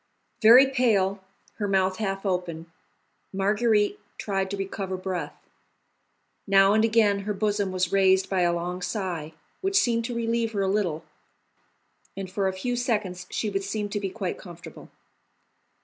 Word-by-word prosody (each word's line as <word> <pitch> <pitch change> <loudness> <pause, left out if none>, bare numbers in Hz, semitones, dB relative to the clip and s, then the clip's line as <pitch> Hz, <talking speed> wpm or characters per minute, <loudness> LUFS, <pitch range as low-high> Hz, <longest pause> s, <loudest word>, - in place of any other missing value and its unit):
Very 240 +4 +9
pale, 205 -8 +1 0.4
her 205 - -1
mouth 190 -1 +1
half 195 -2 -3
open, 180 -4 -2 0.7
Marguerite 210 - +1 0.2
tried 195 -2 -2
to 200 - -4
recover 195 -1 -4
breath. 185 -5 -4 1.1
Now 195 0 +5
and 215 +1 +3
again 220 -3 +3
her 205 +1 -3
bosom 205 -1 0
was 185 -1 -1
raised 190 -1 +3
by 190 -2 0
a 175 -1 +3
long 175 +1 -3
sigh, 180 -6 -4 0.3
which 390 +1 +1
seemed 235 -10 +2
to 240 0 -4
relieve 230 -1 -1
her 200 - -1
a - - 0
little, 190 -6 -1 1.1
and 190 -1 -6
for 195 0 0
a 190 - -1
few 245 +7 -3
seconds 205 -7 -2
she 215 - -2
would 195 0 -2
seem 205 +1 -3
to 205 - -2
be 195 -1 -3
quite 190 -2 -4
comfortable. 175 -2 -12
195 Hz, 155 wpm, -26 LUFS, 185-215 Hz, 1.1 s, Very